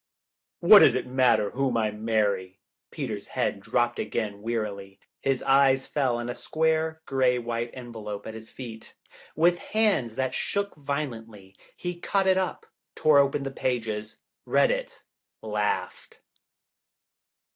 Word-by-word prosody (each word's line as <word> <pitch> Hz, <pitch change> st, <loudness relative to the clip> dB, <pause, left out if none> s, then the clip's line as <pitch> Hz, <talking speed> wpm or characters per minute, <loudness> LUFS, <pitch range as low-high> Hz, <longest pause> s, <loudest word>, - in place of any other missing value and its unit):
"What -, -, +9 dB
does -, -, +6 dB
it -, -, -1 dB
matter 125 Hz, -5 st, +2 dB
whom 130 Hz, -2 st, 0 dB
I 110 Hz, -2 st, +1 dB
marry?" 105 Hz, -4 st, -1 dB, 0.3 s
Peter's -, -, -5 dB
head -, -, -1 dB
dropped 120 Hz, +3 st, 0 dB
again, 105 Hz, -3 st, -3 dB
wearily. 105 Hz, -4 st, -4 dB, 0.2 s
His 135 Hz, -2 st, -1 dB
eyes 135 Hz, -1 st, +4 dB
fell 130 Hz, -5 st, 0 dB
on 120 Hz, 0 st, -4 dB
a 120 Hz, -, -3 dB
square, 160 Hz, +1 st, -1 dB
gray 130 Hz, -2 st, +2 dB
white 120 Hz, 0 st, -3 dB
envelope 110 Hz, -5 st, -7 dB
at 110 Hz, -, -6 dB
his 110 Hz, 0 st, -10 dB
feet. 115 Hz, -4 st, -10 dB, 0.4 s
With 175 Hz, +3 st, +3 dB
hands 200 Hz, -, +1 dB
that 130 Hz, 0 st, -1 dB
shook 200 Hz, 0 st, -2 dB
violently 115 Hz, -9 st, -5 dB, 0.2 s
he 175 Hz, -1 st, -5 dB
caught 195 Hz, +2 st, 0 dB
it 190 Hz, 0 st, +4 dB
up, 185 Hz, -2 st, -3 dB, 0.3 s
tore 155 Hz, -2 st, +5 dB
open 140 Hz, 0 st, +2 dB
the 135 Hz, -, -4 dB
pages. 110 Hz, -5 st, -3 dB, 0.3 s
Read -, -, +3 dB
it, -, -, -4 dB, 0.4 s
laughed. -, -, -3 dB
125 Hz, 135 wpm, -26 LUFS, 110-145 Hz, 0.4 s, What